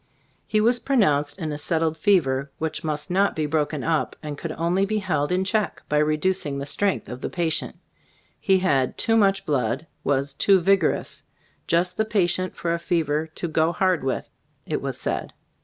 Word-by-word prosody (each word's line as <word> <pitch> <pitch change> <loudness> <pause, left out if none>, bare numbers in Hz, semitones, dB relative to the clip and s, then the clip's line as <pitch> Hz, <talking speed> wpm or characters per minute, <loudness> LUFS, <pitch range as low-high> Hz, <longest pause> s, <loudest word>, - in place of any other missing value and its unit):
He 215 - +2
was 240 +3 +3
pronounced 170 - +2
in 160 -5 -3
a 145 - -4
"settled 160 +1 +1
fever," 150 -7 +2
which 160 0 -3
must 155 +1 -3
not 195 +2 +2
be 155 - -1
"broken 150 -1 -1
up," 160 -2 0
and 150 -1 -4
could 160 +2 -5
only 175 +4 +1
be 215 +2 0
held 180 -7 -1
in 185 +1 +2
check 210 +2 -1
by 150 - +2
reducing 155 0 0
the 140 - -4
strength 195 +7 0
of 125 +1 -7
the - - -3
pa 175 - -2
tient. 160 -1 -1 0.6
He 190 -1 +3
had 140 -9 +1
"too 225 - +2
much 195 -3 +3
blood," 135 +1 0 0.2
was 140 0 0
"too 195 +6 +4
vigorous," 190 -2 +1 0.5
"just 180 +2 +1
the 220 - +2
patient 185 -3 0
for 170 -1 -1
a 170 - -1
fever 160 -2 0
to 175 - -3
'go 160 +1 +2
hard 185 -4 +1
with/ 135 - -2 0.2
" - - -42
it - - -2
was - - -3
said. - - -3
165 Hz, 190 wpm, -24 LUFS, 150-190 Hz, 0.6 s, too